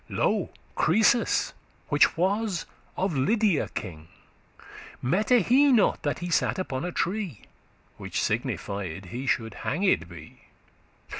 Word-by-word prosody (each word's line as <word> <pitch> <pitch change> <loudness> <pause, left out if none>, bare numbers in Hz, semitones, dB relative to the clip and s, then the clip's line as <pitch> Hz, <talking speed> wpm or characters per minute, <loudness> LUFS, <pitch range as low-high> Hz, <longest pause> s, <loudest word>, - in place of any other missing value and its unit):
Lo - - 0 0.2
Croesus, 220 +7 +2 0.4
which - - +6
that - - -14
was 195 +1 0 0.3
of 185 -3 0
Lydia 200 - +2
king, 80 -6 -6 0.9
Mette 210 - +2
he 275 +3 +5
not 230 -6 +3
that 145 -3 -1
he 175 +1 -5
sat - - +1
upon 135 -8 -3
a 180 - -3
tree, 180 - -2 0.6
Which - - -4
signified 95 -2 -3
he 130 +3 -5
shoulde 110 -4 -1
hanged 185 +7 +1
be? 85 -3 -13
175 Hz, 125 wpm, -26 LUFS, -, 0.9 s, which